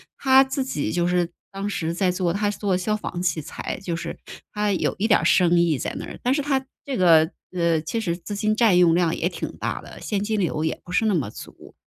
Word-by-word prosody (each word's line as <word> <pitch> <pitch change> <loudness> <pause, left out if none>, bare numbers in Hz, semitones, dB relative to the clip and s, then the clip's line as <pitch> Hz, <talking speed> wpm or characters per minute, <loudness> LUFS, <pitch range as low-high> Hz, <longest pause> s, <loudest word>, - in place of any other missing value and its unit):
他 265 0 +5
自 270 0 -2
己 150 - -2
就 175 +1 +1
是 175 -1 +1 0.2
当 195 +1 -4
时 165 -5 -2
在 185 -1 +2
做 180 -2 0
他 205 +1 0
是 - - -9
做 195 -3 +1
消 210 +4 -1
防 180 -4 -5
器 165 -3 0
材， 155 - -6
就 170 -3 -2
是 170 0 -6 0.3
他 210 -1 0
有 - - 0
一 220 - +1
点 205 - +5
儿 - - -3
生 175 -1 +4
意 165 -5 +2
在 - - -3
那 - - -5
儿。 - - -9
但 250 - +2
是 290 - +1
他 275 -2 0 0.2
这 275 -2 -3
个 165 -2 +5 0.2
呃， 170 -3 +1
其 200 +8 -3
实 170 -4 -1
资 205 +3 -7
金 215 +1 +1
占 215 -5 +4
用 175 -2 +5
量 175 -2 +2
也 - - 0
挺 - - -6
大 - - -3
的， - - -12
现 205 -2 -2
金 215 0 -1
流 165 -4 -1
也 - - -2
不 175 - -11
是 210 +5 +2
那 215 - +2
么 135 -10 -1
足。 - - -12
185 Hz, 275 characters per minute, -23 LUFS, 170-215 Hz, 0.3 s, 他